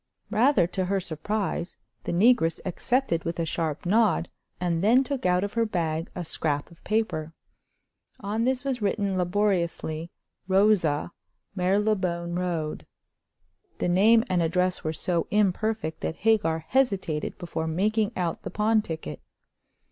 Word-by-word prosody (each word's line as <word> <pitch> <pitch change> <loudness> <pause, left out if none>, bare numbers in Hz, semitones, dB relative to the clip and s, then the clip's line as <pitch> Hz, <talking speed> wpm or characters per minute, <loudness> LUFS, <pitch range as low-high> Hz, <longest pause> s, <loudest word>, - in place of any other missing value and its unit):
Rather 235 -1 +4
to 185 +2 -2
her 195 +1 0
surprise, 185 +2 -3 0.3
the - - -2
negress 185 -3 +3
accepted 190 -1 0
with 170 0 -4
a 165 - +1
sharp 160 -1 -2
nod, 205 -3 +2 0.3
and 175 -1 0
then 240 +6 +5
took 270 -7 -2
out 180 +1 +2
of 205 - -3
her 230 - +2
bag 165 -6 -2
a 180 - -4
scrap 145 -1 -2
of 170 - -18
paper. 175 -8 -1 0.8
On 210 +3 -2
this 255 +1 0
was 265 -4 -2
written 200 -1 0
laboriously: 175 -4 0 0.4
"Rosa, 190 -6 +3 0.4
Marylebone 185 -3 0
Road." 170 -4 -3 0.9
The - - -1
name 220 +6 +5
and 180 -2 +1
address 180 +2 0
were 155 - -1
so 170 +1 -1
imperfect 210 -3 0
that - - -2
Hagar 165 -8 +2
hesitated 195 - 0
before 160 -2 -4
making 210 +6 +1
out 175 -3 -2
the - - -5
pawn 215 +3 +2
ticket. 160 - -6
185 Hz, 140 wpm, -26 LUFS, 165-215 Hz, 0.9 s, then